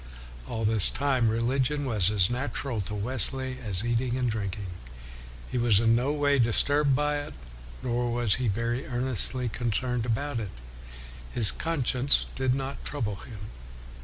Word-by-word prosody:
All 115 Hz, -1 st, -3 dB
this 110 Hz, -2 st, +3 dB
time, 130 Hz, -4 st, +1 dB
religion 130 Hz, +5 st, 0 dB
was 105 Hz, -8 st, +1 dB
as 100 Hz, -4 st, +3 dB
natural 125 Hz, -1 st, -2 dB
to 100 Hz, +2 st, -6 dB
Wesley 130 Hz, +4 st, 0 dB
as 100 Hz, -3 st, -3 dB
eating 120 Hz, +1 st, -1 dB
and 125 Hz, -2 st, 0 dB
drinking. 100 Hz, -2 st, -4 dB, 0.9 s
He 125 Hz, -, -1 dB
was 115 Hz, -4 st, +4 dB
in 115 Hz, 0 st, +3 dB
no 125 Hz, +4 st, 0 dB
way 145 Hz, -2 st, +1 dB
disturbed 140 Hz, +4 st, +4 dB
by 150 Hz, +1 st, 0 dB
it, 145 Hz, -, -7 dB, 0.5 s
nor 120 Hz, -1 st, -1 dB
was 120 Hz, -4 st, +1 dB
he 125 Hz, -, 0 dB
very 115 Hz, +4 st, -2 dB
earnestly 125 Hz, 0 st, +3 dB
concerned 120 Hz, +1 st, -2 dB
about 120 Hz, +2 st, -2 dB
it. 105 Hz, -4 st, -5 dB, 0.8 s
His 110 Hz, -4 st, +7 dB
con 160 Hz, -6 st, -3 dB
science 130 Hz, +3 st, +2 dB
did 130 Hz, -1 st, 0 dB
not 135 Hz, +1 st, -5 dB
trouble 110 Hz, -9 st, -4 dB
him. 105 Hz, -2 st, -10 dB
120 Hz, 155 wpm, -27 LUFS, 110-130 Hz, 0.9 s, His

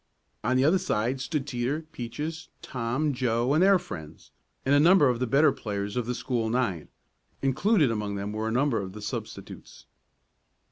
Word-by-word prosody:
On 125 Hz, +3 st, +2 dB
the 130 Hz, -, +3 dB
other 175 Hz, +5 st, +4 dB
side 125 Hz, +2 st, -1 dB
stood 135 Hz, 0 st, -2 dB
Teeter, 135 Hz, +3 st, -2 dB
Peaches, 150 Hz, +4 st, -5 dB, 0.2 s
Tom, 130 Hz, +5 st, -1 dB
Joe 125 Hz, 0 st, +1 dB
and 155 Hz, -, +3 dB
their 195 Hz, +1 st, +6 dB
friends, 80 Hz, -, -9 dB, 0.3 s
and 135 Hz, -, +3 dB
a 145 Hz, -, +6 dB
number 170 Hz, -1 st, +6 dB
of 120 Hz, -2 st, 0 dB
the 125 Hz, -, 0 dB
better 140 Hz, +6 st, +5 dB
players 100 Hz, -1 st, -4 dB
of 120 Hz, -2 st, -1 dB
the 125 Hz, -, -1 dB
school 120 Hz, -4 st, -1 dB
nine. 110 Hz, -10 st, -1 dB, 0.6 s
Included 150 Hz, -, +3 dB
among 105 Hz, -2 st, -2 dB
them 100 Hz, +1 st, -4 dB
were 110 Hz, +1 st, -2 dB
a -, -, -1 dB
number 125 Hz, -1 st, +1 dB
of 95 Hz, -1 st, -7 dB
the 105 Hz, -, -9 dB
substitutes. -, -, -7 dB
125 Hz, 180 wpm, -27 LUFS, 110-145 Hz, 0.6 s, their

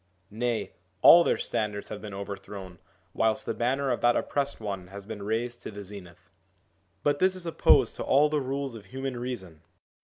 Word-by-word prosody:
Nay, 120 Hz, +1 st, -1 dB, 0.3 s
all 170 Hz, +1 st, +10 dB
their -, -, +2 dB
standards 105 Hz, -2 st, -2 dB
have -, -, -6 dB
been 105 Hz, -1 st, -7 dB
overthrown, 100 Hz, -2 st, -7 dB, 0.3 s
whilst 110 Hz, -1 st, +1 dB
the -, -, -1 dB
banner 130 Hz, +3 st, 0 dB
of 120 Hz, -, -1 dB
that 120 Hz, 0 st, +4 dB
Oppressed 140 Hz, 0 st, -1 dB
One 100 Hz, -4 st, -5 dB
has 100 Hz, +1 st, -9 dB
been 110 Hz, -1 st, -7 dB
raised 115 Hz, +4 st, -2 dB
to -, -, -6 dB
the 100 Hz, -1 st, -8 dB
zenith. 95 Hz, -4 st, -12 dB, 0.7 s
But 145 Hz, 0 st, +2 dB
this 185 Hz, 0 st, +3 dB
is 185 Hz, -2 st, -8 dB
opposed 165 Hz, -, +4 dB
to -, -, -3 dB
all 145 Hz, +3 st, +4 dB
the 150 Hz, -1 st, 0 dB
rules 135 Hz, 0 st, -3 dB
of 110 Hz, -3 st, -10 dB
human 130 Hz, -1 st, -5 dB
reason. 95 Hz, -11 st, -6 dB
115 Hz, 185 wpm, -28 LUFS, 100-135 Hz, 0.7 s, all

